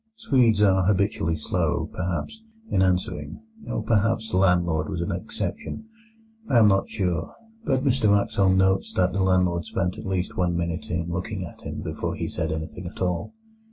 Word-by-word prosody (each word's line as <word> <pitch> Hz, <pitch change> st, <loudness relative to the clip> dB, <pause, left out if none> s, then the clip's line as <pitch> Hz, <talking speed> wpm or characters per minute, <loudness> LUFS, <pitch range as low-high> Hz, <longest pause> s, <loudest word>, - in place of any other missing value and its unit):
Swedes 125 Hz, -, +3 dB
are 95 Hz, -2 st, +4 dB
habitually 100 Hz, -4 st, +1 dB
slow, 75 Hz, -, -1 dB
perhaps, 90 Hz, -, -3 dB, 0.3 s
in 95 Hz, -, +3 dB
answering, 90 Hz, -1 st, 0 dB, 0.3 s
or -, -, -2 dB
perhaps 110 Hz, 0 st, +1 dB
the -, -, +1 dB
landlord 85 Hz, -4 st, +2 dB
was 85 Hz, -, -3 dB
an 85 Hz, -, -2 dB
exception. -, -, -4 dB, 0.6 s
I 120 Hz, -, +4 dB
am 110 Hz, -2 st, +7 dB
not 95 Hz, -1 st, +2 dB
sure; 90 Hz, -6 st, -2 dB, 0.3 s
but 130 Hz, -1 st, +1 dB
Mr 130 Hz, -6 st, +2 dB
Wraxall 100 Hz, -1 st, +3 dB
notes 95 Hz, 0 st, +2 dB
that 90 Hz, -1 st, +2 dB
the 100 Hz, -, 0 dB
landlord 90 Hz, -2 st, +2 dB
spent 95 Hz, -1 st, -2 dB
at -, -, -7 dB
least 95 Hz, -1 st, -2 dB
one 90 Hz, -1 st, +1 dB
minute 85 Hz, -1 st, -3 dB
in 85 Hz, 0 st, -2 dB
looking 90 Hz, +2 st, -3 dB
at 85 Hz, -, -12 dB
him -, -, -6 dB
before -, -, -3 dB
he -, -, -3 dB
said 80 Hz, -2 st, -2 dB
anything 80 Hz, +3 st, -5 dB
at -, -, -10 dB
all. 90 Hz, -, -2 dB
95 Hz, 175 wpm, -25 LUFS, 85-100 Hz, 0.6 s, am